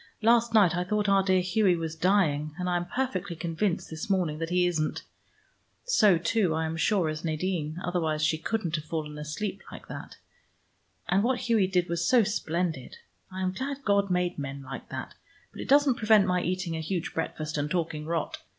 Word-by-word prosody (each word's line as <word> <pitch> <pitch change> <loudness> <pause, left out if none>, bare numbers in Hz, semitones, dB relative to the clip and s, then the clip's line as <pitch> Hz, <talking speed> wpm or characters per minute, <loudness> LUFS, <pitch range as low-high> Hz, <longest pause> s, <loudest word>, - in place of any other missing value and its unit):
Last 235 +1 +4
night 200 -7 +5
I 180 - 0
thought 210 +2 0
our 195 0 +5
dear 190 -1 +3
Hughie 185 0 +2
was 165 -1 -4
dying, 160 -5 +1
and 180 -1 -3
I 180 - +1
am 175 0 -3
perfectly 200 -7 -2
convinced 170 +3 -1
this 160 +5 -6
morning 175 -6 0
that 165 0 -3
he 180 0 +2
isn't. 160 -3 -1 0.8
So, 215 - +5
too, 175 0 +1
I 160 0 0
am 160 0 -3
sure, 180 +1 +2
is 155 0 -4
Nadine: 160 -1 -2
otherwise 160 -4 0
she 160 +1 +1
couldn't 175 -2 -2
have 155 - -7
fallen 150 -2 -4
asleep 185 +7 -4
like - - -10
that. - - -8 0.9
And 190 +2 +3
what 250 +1 +1
Hughie 225 -5 +2
did 180 -2 +1
was 170 0 -1
so 245 -3 +6
splendid. 170 - -2 0.3
I 190 0 -4
am 185 - +1
glad 275 +6 -5
God 200 -1 +2
made 180 -2 0
men 140 0 -5
like 135 0 -8
that, - - -6 0.4
but - - -8
it - - -7
doesn't 280 -2 +5
prevent 215 -2 +5
my 180 0 +1
eating 180 -2 -2
a - - -3
huge 175 +2 -3
breakfast 155 -1 -3
and 145 0 -1
talking 160 -3 -2
rot. 165 -1 -2
180 Hz, 195 wpm, -28 LUFS, 160-200 Hz, 0.9 s, so